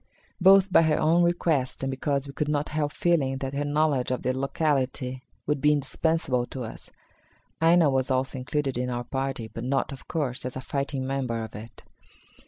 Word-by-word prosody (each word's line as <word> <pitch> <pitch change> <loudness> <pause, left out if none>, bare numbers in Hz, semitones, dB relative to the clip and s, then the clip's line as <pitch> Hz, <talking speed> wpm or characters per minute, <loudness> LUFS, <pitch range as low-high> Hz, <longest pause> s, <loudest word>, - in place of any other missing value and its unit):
Both 195 +1 +6
by - - +8
her 160 -2 +2
own 165 +3 +4
request 165 -7 +1
and 135 - -1
because 140 +1 -1
we 140 - -9
could 150 - -2
not 150 0 0
help 150 -1 -1
feeling 145 -7 +1
that 135 0 -4
her 140 +1 -1
knowledge 145 -3 +1
of 125 - -2
the 130 0 0
locality 130 -2 -1 0.2
would 150 -1 -1
be 150 0 +5
indispensable 140 -3 0
to 130 - -6
us, 110 - -9 0.7
Aina 165 0 +5
was 135 -1 +1
also 130 0 0
included 135 -1 -2
in 125 0 -1
our 120 0 -2
party, 135 -2 -3
but - - -7
not, 135 +3 0
of 135 - -10
course, 135 -6 -2
as 125 - -5
a - - -3
fighting 140 0 -3
member 130 -4 -2
of 110 - -8
it. 110 +2 -10
135 Hz, 190 wpm, -26 LUFS, 130-150 Hz, 0.7 s, by